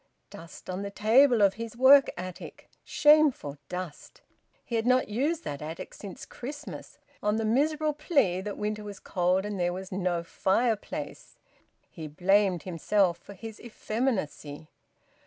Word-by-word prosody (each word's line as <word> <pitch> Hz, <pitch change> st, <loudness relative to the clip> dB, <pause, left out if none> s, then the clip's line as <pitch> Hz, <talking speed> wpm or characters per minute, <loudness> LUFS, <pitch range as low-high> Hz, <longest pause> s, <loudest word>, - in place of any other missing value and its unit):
Dust 165 Hz, 0 st, -12 dB
on 185 Hz, +1 st, -4 dB
the 200 Hz, -, -4 dB
table 225 Hz, +3 st, +4 dB
of 195 Hz, -1 st, +5 dB
his 230 Hz, +1 st, -7 dB
work 275 Hz, +2 st, +7 dB
attic! 180 Hz, 0 st, -9 dB
Shameful 295 Hz, -, +3 dB
dust! 180 Hz, -4 st, -7 dB, 0.4 s
He -, -, -9 dB
had 225 Hz, +1 st, 0 dB
not 255 Hz, -1 st, +3 dB
used 295 Hz, +10 st, -1 dB
that 145 Hz, -, -5 dB
attic 160 Hz, +2 st, -7 dB
since 200 Hz, -3 st, -9 dB
Christmas, 290 Hz, +4 st, -8 dB, 0.2 s
on 210 Hz, 0 st, +1 dB
the 225 Hz, 0 st, -1 dB
miserable 300 Hz, +6 st, +1 dB
plea 280 Hz, -, +1 dB
that 205 Hz, +1 st, -5 dB
winter 210 Hz, 0 st, -3 dB
was 205 Hz, -1 st, -8 dB
cold 180 Hz, +2 st, 0 dB
and 205 Hz, -2 st, -4 dB
there 175 Hz, 0 st, 0 dB
was 190 Hz, +1 st, -7 dB
no 180 Hz, -2 st, -1 dB
fireplace! 210 Hz, +6 st, -2 dB, 0.5 s
He 160 Hz, -3 st, -8 dB
blamed 185 Hz, +3 st, +2 dB
himself 185 Hz, +1 st, +1 dB
for 200 Hz, -, -13 dB
his 220 Hz, +1 st, -9 dB
effeminacy. 215 Hz, -, -3 dB
205 Hz, 145 wpm, -28 LUFS, 180-245 Hz, 0.5 s, work